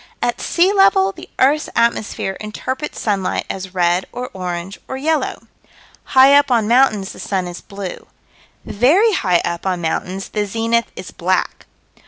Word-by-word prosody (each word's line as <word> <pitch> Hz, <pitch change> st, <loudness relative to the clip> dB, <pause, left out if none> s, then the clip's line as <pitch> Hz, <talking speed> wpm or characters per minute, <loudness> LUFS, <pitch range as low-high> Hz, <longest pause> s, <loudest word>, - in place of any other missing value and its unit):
At -, -, -1 dB
sea 360 Hz, +3 st, +2 dB
level, 390 Hz, -1 st, +4 dB
the -, -, -12 dB
earth's 295 Hz, +4 st, +2 dB
atmosphere 230 Hz, -4 st, 0 dB
interprets 260 Hz, +7 st, -5 dB
sunlight 200 Hz, -4 st, -1 dB
as 190 Hz, -1 st, -7 dB
red 175 Hz, +1 st, +1 dB
or 250 Hz, +1 st, -6 dB
orange 180 Hz, 0 st, -5 dB
or 265 Hz, -, -5 dB
yellow. 310 Hz, +3 st, -1 dB, 0.7 s
High 265 Hz, +2 st, +8 dB
up 285 Hz, 0 st, +5 dB
on 230 Hz, -4 st, +2 dB
mountains 230 Hz, -5 st, +3 dB
the -, -, -12 dB
sun 190 Hz, -2 st, -2 dB
is 175 Hz, 0 st, -8 dB
blue. 195 Hz, -2 st, -8 dB, 0.6 s
Very 330 Hz, -, +3 dB
high 180 Hz, -, +2 dB
up 170 Hz, +2 st, -3 dB
on 185 Hz, -2 st, 0 dB
mountains 185 Hz, +4 st, -3 dB
the 210 Hz, -1 st, -2 dB
zenith 230 Hz, +2 st, 0 dB
is -, -, -8 dB
black. -, -, -2 dB
215 Hz, 155 wpm, -18 LUFS, 190-270 Hz, 0.7 s, High